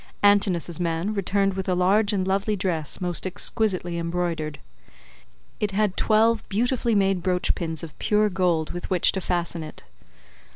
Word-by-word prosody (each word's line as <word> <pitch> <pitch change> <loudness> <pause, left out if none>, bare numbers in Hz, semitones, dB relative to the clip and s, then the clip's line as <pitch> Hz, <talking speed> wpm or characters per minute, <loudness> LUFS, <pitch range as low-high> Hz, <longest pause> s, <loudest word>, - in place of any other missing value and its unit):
Antinous's 190 -5 +3
man 170 +4 -1
returned 195 0 0
with 190 0 -4
a 180 - +2
large 200 +4 +3
and 190 -2 -1
lovely 200 +2 0
dress 175 -6 -1
most 180 0 -1
exquisitely 185 -3 0
embroidered. 170 -3 -2 1.0
It 205 -2 -1
had 205 -1 +1
twelve 225 +1 +3
beautifully 235 +2 0
made 195 -2 +2
brooch 180 0 +1
pins 160 -1 -4
of 155 -2 -9
pure 210 0 +2
gold 180 -5 0
with 175 - -6
which 185 -2 +3
to 190 - -4
fasten 175 -2 -2
it. 155 -1 -10
185 Hz, 155 wpm, -24 LUFS, 175-205 Hz, 1.0 s, Antinous's